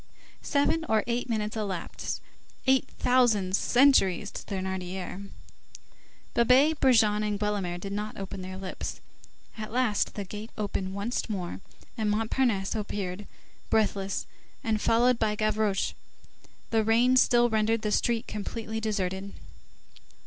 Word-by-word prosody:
Seven 295 +2 +1
or 220 -2 +3
eight 245 +1 -2
minutes 215 -1 -1
elapsed, 200 -5 -4 0.4
eight 265 -1 +3
thousand 225 -7 +3
centuries 210 -7 +4
to - - -6
Thénardier; 190 0 -4 1.0
Babet, 265 +6 +4
Brujon, 220 -5 +4
and 210 -1 -1
Guelemer 205 -4 -1
did 195 +2 -5
not 210 +1 -4
open 195 0 -6
their 185 0 -6
lips; 190 -1 -5 0.6
at 215 0 -5
last 240 -4 +1
the 205 - -3
gate 210 +3 -7
opened 195 -2 -3
once 230 +4 -2
more, 185 -3 -4 0.4
and 215 -1 +1
Montparnasse 220 -1 +1
appeared, 205 -2 -4 0.4
breathless, 200 -3 0 0.4
and 220 -2 0
followed 235 +1 +3
by 215 -1 +1
Gavroche. 215 -2 0 0.8
The 225 -1 +3
rain 235 +4 +4
still 240 -2 +4
rendered 220 +1 +1
the 210 - 0
street 230 +1 +1
completely 220 +1 -4
deserted. 195 -2 -2
215 Hz, 125 wpm, -28 LUFS, 195-230 Hz, 1.0 s, centuries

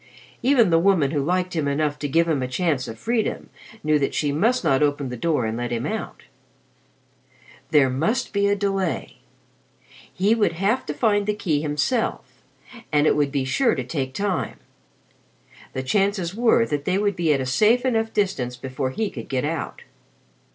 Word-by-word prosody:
Even 240 -6 +4
the 165 - +5
woman 170 -6 +3
who 145 -3 0
liked 180 +4 -1
him 155 -3 0
enough 145 +1 -1
to 145 - -2
give 165 +4 +2
him 155 -5 0
a 130 - -1
chance 145 -1 -1
of 115 - -7
freedom 225 - -2 0.3
knew 155 -1 +3
that 140 - -1
she 145 -2 0
must 225 - +1
not 140 -4 +2
open 145 -2 0
the 125 - -5
door 145 -1 0
and 110 0 -2
let 120 0 -3
him 120 +2 -2
out. 220 +8 -5 1.5
There 145 -4 +5
must 210 - -1
be 200 0 +2
a 200 - +2
delay. 195 -3 -2 0.9
He 200 +4 +2
would 215 -7 +1
have 195 +9 0
to 150 - -3
find 205 +4 +1
the 210 - +1
key 155 -8 0
himself, 155 - -2 0.5
and 150 -1 +3
it - - +4
would 145 -2 +1
be 135 -2 -1
sure 235 - +2
to - - -3
take 135 -4 -4
time. 200 -4 -2 1.2
The 130 - -3
chances 195 +3 0
were 230 +1 +3
that 145 -7 -3
they 185 - +1
would 205 -1 0
be 170 -3 +1
at 140 - +2
a 130 - -2
safe 220 - +3
enough 225 -3 +1
distance 135 -12 -1
before 130 +1 -3
he 210 +10 -2
could 115 - -8
get 130 +1 -1
out. 160 0 -4
165 Hz, 185 wpm, -23 LUFS, 140-205 Hz, 1.5 s, the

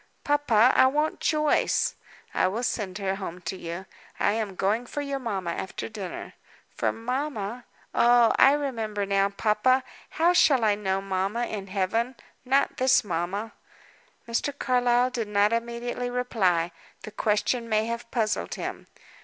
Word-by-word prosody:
"Papa, 260 -5 +4
I 260 - +6
want 300 +3 0
Joyce." 305 -1 +2 0.4
"I - - +2
will 220 +6 -2
send 200 -6 -2
her 195 -1 -2
home 180 -3 -6
to 175 +2 -4
you. 170 +1 -6 0.3
I 205 - +3
am 210 -3 -2
going 215 +6 0
for 290 - -4
your 280 -1 -3
mamma 195 -8 -3
after 190 - -5
dinner." 205 -5 -7 0.4
"For - - +1
mamma? 245 -2 -4 0.3
oh, 240 -1 +5
I 275 - +6
remember 225 -8 -2
now. 195 0 +2
Papa, 215 +6 +2 0.3
how 340 +2 +4
shall 295 -8 +4
I 215 -1 +4
know 195 -2 -1
mamma 195 +5 -1
in 200 -4 -5
Heaven? 210 +6 -1 0.3
Not 270 +2 +2
this 260 +1 +4
mamma." 195 +4 -3 0.8
Mr. 275 +5 -1
Carlyle 245 -1 +2
did 230 -4 -3
not 205 +1 +2
immediately 235 +1 -2
reply. 190 -9 +1 0.3
The 215 - -7
question 220 +3 0
may 215 0 +2
have 235 0 -5
puzzled 220 -3 -1
him. - - -6
225 Hz, 150 wpm, -26 LUFS, 200-250 Hz, 0.8 s, I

